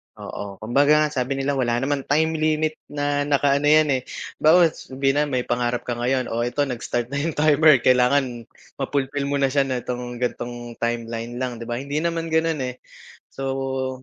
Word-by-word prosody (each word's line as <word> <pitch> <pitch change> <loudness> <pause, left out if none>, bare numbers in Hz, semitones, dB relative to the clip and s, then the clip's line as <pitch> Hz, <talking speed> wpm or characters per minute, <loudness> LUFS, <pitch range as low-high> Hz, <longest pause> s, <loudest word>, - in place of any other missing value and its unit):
Oo, 100 -1 -7
kumbaga 140 +6 +3
nga, 150 0 +3
sabi 130 -1 -1
nila 135 0 -1
wala 120 -2 +1
naman 135 +2 -1
time 160 +2 +1
limit 155 0 0
na 145 0 -1
nakaano 140 0 +2
'yan, 150 -3 +4
eh, - - -13 0.4
bagkus 165 +1 +4
sabi 135 +1 0
na 145 +2 +1
may 130 -3 -1
pangarap 120 0 -1
ka - - -4
ngayon, 125 +2 -1
o 115 - -1
eto 120 +5 0
nag-start 120 -2 -3
na 140 - -1
'yong 160 +1 -2
timer 150 -3 +5
kailangan 125 -1 +2 0.3
ma-fulfill 140 0 -1
mo 140 - -1
na 135 -1 +1
siya 140 0 +2
na 130 -2 -2
'tong 125 0 -5
ganitong 120 -1 -5
timeline 115 0 -3
lang 125 -2 -4
'di 115 - -7
ba? 120 - -2
Hindi 140 +2 -2
naman 165 0 -2
gano'n, 160 -3 +1
eh, 125 0 -5 0.5
so 135 -1 -3
135 Hz, 185 wpm, -23 LUFS, 125-145 Hz, 0.5 s, timer